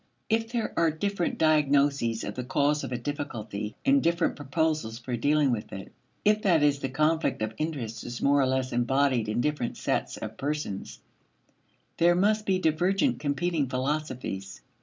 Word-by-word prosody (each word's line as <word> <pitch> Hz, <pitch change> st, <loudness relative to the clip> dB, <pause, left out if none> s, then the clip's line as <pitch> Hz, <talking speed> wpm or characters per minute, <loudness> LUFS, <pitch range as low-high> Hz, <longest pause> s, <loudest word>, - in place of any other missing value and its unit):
If 225 Hz, +1 st, 0 dB
there 235 Hz, -2 st, -2 dB
are 165 Hz, -1 st, +3 dB
different 180 Hz, +3 st, -2 dB
diagnoses 140 Hz, -6 st, +2 dB
of -, -, -4 dB
the 125 Hz, -, -4 dB
cause 145 Hz, +3 st, +1 dB
of -, -, -5 dB
a 125 Hz, -, -1 dB
difficulty, 115 Hz, -7 st, -5 dB
and 275 Hz, 0 st, +5 dB
different 170 Hz, +1 st, +1 dB
proposals 145 Hz, -4 st, -1 dB
for 125 Hz, +1 st, -4 dB
dealing 145 Hz, +3 st, +2 dB
with 110 Hz, -3 st, -3 dB
it; 95 Hz, -1 st, -8 dB, 0.3 s
if, 210 Hz, +1 st, +4 dB
that 170 Hz, -7 st, +3 dB
is, 145 Hz, -1 st, +3 dB
the 135 Hz, -, -3 dB
conflict 155 Hz, -2 st, +1 dB
of 110 Hz, 0 st, -3 dB
interests 140 Hz, -8 st, -3 dB
is 120 Hz, 0 st, -6 dB
more 140 Hz, 0 st, +3 dB
or 130 Hz, -, +2 dB
less 130 Hz, 0 st, 0 dB
embodied 125 Hz, -1 st, +1 dB
in 110 Hz, +3 st, 0 dB
different 145 Hz, -4 st, -1 dB
sets -, -, -1 dB
of 110 Hz, 0 st, -7 dB
persons, 145 Hz, -9 st, -4 dB, 1.0 s
there 175 Hz, +1 st, +4 dB
must 210 Hz, +3 st, +2 dB
be 190 Hz, -1 st, +3 dB
divergent 185 Hz, -, +1 dB
competing 150 Hz, 0 st, -1 dB
philosophies. 130 Hz, -7 st, -3 dB
145 Hz, 165 wpm, -27 LUFS, 125-165 Hz, 1.0 s, and